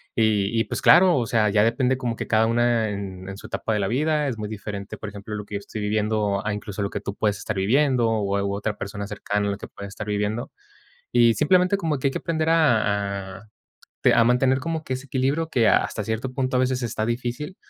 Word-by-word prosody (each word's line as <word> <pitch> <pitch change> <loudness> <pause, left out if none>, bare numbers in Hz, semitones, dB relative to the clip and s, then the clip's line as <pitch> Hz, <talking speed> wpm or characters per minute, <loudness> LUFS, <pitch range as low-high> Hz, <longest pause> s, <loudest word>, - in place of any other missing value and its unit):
Y 110 -1 +2
y - - -1
pues - - -4
claro, 180 -1 +6
o 120 - 0
sea, 110 -3 +2
ya 105 +1 +3
depende 125 +3 +2
como 120 -3 -2
que - - -5
cada 110 0 +3
una 115 -1 +2
en 95 -2 -6
en 95 - -7
su - - -10
etapa - - -3
de 105 - 0
la 100 - 0
vida 150 +5 +1
es 125 -5 -3
muy 105 -1 -5
diferente, 105 -2 -6
por - - -7
ejemplo, 105 +1 -7
lo 105 -1 -6
que 105 - -7
yo - - -1
estoy 105 +2 -8
viviendo 105 -1 0
a 105 - 0
incluso 105 0 -5
lo 100 - -1
que 100 - -3
tú 100 0 -5
puedes 105 -2 0
estar 105 - -4
viviendo, 120 +4 +2
o 105 -3 0
a 100 - 0
o 100 0 -1
a - - -3
otra 105 0 -3
persona 100 0 -5
cercana 100 0 -2
a - - 0
lo 100 - -4
que - - -9
puedes 100 - -9
estar 105 +1 -7
viviendo. 105 +3 -2 0.6
Y 120 -1 +5
simplemente 180 - +3
como 160 -6 -1
que 130 - -1
hay - - -4
que - - -2
aprender 160 -1 -1
a 100 -10 +1
a - - -16 0.6
te - - +5
a - - +5
mantener 130 +2 +3
como 160 +2 -3
que 130 - -4
ese 130 +2 -7
equilibrio 140 +5 0
que 120 -6 +2
hasta 105 - +1
cierto 110 +4 -3
punto 130 -1 0
a - - +3
veces 130 0 0
está 110 -2 -2
difícil, 125 +9 -3
110 Hz, 250 wpm, -24 LUFS, 105-130 Hz, 0.6 s, claro